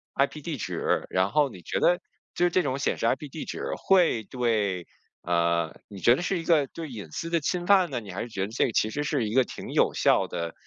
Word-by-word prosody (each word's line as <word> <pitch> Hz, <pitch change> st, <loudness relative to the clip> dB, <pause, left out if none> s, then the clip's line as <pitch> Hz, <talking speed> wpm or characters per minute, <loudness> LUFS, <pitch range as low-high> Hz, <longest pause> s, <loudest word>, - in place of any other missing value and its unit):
IP 140 Hz, +2 st, 0 dB
地 155 Hz, -3 st, -3 dB
址， -, -, -1 dB
然 95 Hz, +1 st, +1 dB
后 145 Hz, +2 st, +3 dB
你 95 Hz, -7 st, -12 dB
觉 -, -, -2 dB
得 175 Hz, 0 st, +3 dB, 0.4 s
就 175 Hz, 0 st, +3 dB
这 185 Hz, -, +2 dB
种 135 Hz, -2 st, -1 dB
显 140 Hz, -, 0 dB
示 -, -, -2 dB
IP 140 Hz, +5 st, 0 dB
地 155 Hz, -, -6 dB
址 -, -, -5 dB, 0.2 s
会 175 Hz, -, +4 dB
对， 105 Hz, -7 st, -1 dB, 0.4 s
啊， 85 Hz, -1 st, +1 dB
你 100 Hz, -2 st, -10 dB
觉 120 Hz, +6 st, +5 dB
得 140 Hz, -, -4 dB
是 185 Hz, +1 st, 0 dB
一 -, -, -5 dB
个 155 Hz, -5 st, +3 dB
对 160 Hz, +1 st, -7 dB
隐 105 Hz, -, -8 dB
私 165 Hz, -, -4 dB
的 170 Hz, 0 st, +2 dB
侵 175 Hz, +3 st, -2 dB
犯 190 Hz, -2 st, +5 dB
呢？ 130 Hz, -4 st, -2 dB
你 100 Hz, -3 st, -9 dB
还 90 Hz, -, -4 dB
是 -, -, -4 dB
觉 100 Hz, -, -4 dB
得 95 Hz, -, 0 dB
这 115 Hz, +3 st, +1 dB
其 110 Hz, -, +1 dB
实 145 Hz, +6 st, -2 dB
是 145 Hz, -6 st, 0 dB
一 -, -, -4 dB
个 130 Hz, +1 st, +5 dB
挺 -, -, -8 dB
有 -, -, +3 dB
效 -, -, +3 dB
的 85 Hz, -1 st, -4 dB
130 Hz, 275 characters per minute, -27 LUFS, 100-160 Hz, 0.4 s, 觉